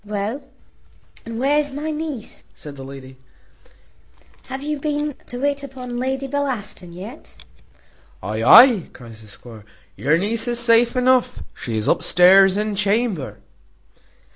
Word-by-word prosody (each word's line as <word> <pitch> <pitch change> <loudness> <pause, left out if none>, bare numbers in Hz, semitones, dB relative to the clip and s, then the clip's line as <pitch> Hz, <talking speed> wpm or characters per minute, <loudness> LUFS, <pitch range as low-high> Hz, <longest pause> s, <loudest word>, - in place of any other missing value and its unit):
"Well, 210 +6 -4 0.9
and 230 0 -6
where's 290 +3 +1
my 300 +3 -4
niece?" 300 -7 -7
says 150 - -11
the 135 -1 -10
lady; 135 -1 -11 1.3
"have 265 +1 -7
you 300 0 -3
been 295 0 -2
to 245 - -8
wait 285 +1 -1
upon 255 -3 -8
Lady 265 +2 -2
Bellaston 255 -10 -4
yet?" 185 +4 -11 0.9
"Ay, 110 +3 -3
ay," 235 - +7
cries 115 -3 -13
the 110 - -15
squire, 110 +1 -12 0.3
"your 150 +4 +1
niece 225 +6 -1
is 240 0 -1
safe 235 +1 +3
enough; 250 0 +1
she 115 -2 -5
is 110 - -2
upstairs 190 +2 +5
in 210 0 -2
chamber." 195 - -1
230 Hz, 135 wpm, -20 LUFS, 170-265 Hz, 1.3 s, ay